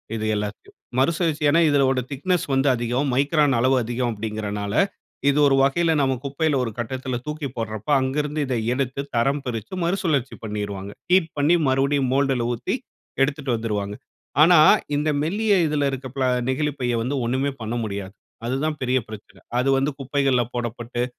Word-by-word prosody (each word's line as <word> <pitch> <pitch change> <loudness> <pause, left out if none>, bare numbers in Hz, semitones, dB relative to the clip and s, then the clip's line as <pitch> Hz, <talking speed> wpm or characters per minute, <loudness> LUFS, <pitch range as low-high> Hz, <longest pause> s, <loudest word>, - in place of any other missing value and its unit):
இது 110 -1 -3
எல்லாத்தையும். 105 0 -5 0.2
மறுசுழற்சி 155 +2 +1
ஏன்னா? 165 - +4
இதனுடைய 135 -3 +2
திக்னெஸ் 175 +5 0
வந்து 135 +1 +2
அதிகம். 120 +4 -1
மைக்ரான் 145 0 +3
அளவு 130 +3 +3
அதிகம். 120 +1 -1
அப்படிங்கிறதுனால 105 -1 -4 0.6
இது 140 +1 +2
ஒரு 135 - +4
வகையில 160 +4 +2
நாம 135 -1 +2
குப்பையில 140 +2 0
ஒரு 115 - -3
கட்டத்துல 130 +1 -3
தூக்கி 150 -1 -4
போடுறப்ப 110 0 -4
அங்கு 130 +2 -1
இருந்து 150 +1 -4
இத 130 - -2 0.2
எடுத்து 130 +1 -2
தரம் 135 +5 +1
பிரித்து 115 - -5
மறுசுழற்சி 170 -7 0
பண்ணிருவாங்க. 100 -2 -4 0.2
ஹீட் 180 -3 +4
பண்ணி 150 +5 +4
மறுபடியும் 135 0 +2
மோல்டுல 135 -3 +1
ஊத்தி 120 - -2 0.5
எடுத்துட்டு 140 -1 0
வந்துருவாங்க. 105 -3 -2 0.5
ஆனா, 170 +3 +7 0.4
இந்த 150 +2 0
மெல்லிய 205 +7 +1
இதில 145 -2 +1
இருக்க 130 0 -5
பிளா 130 -2 +1 0.2
நெகிழிப்பைய 130 -3 -1
வந்து 130 +5 -2
ஒண்ணுமே 130 +4 0
பண்ண 110 +2 -3
முடியாது. 100 -2 -5 0.3
அது 130 - 0
தான் 155 -1 -2
பெரிய 130 0 +2
பிரச்சன. 110 -1 -11 0.2
அது 130 +2 +1
வந்து 135 +2 +1
குப்பைகள்ல 135 -2 +1
போடப்பட்டு 120 0 -3
135 Hz, 155 wpm, -23 LUFS, 120-145 Hz, 0.6 s, ஆனா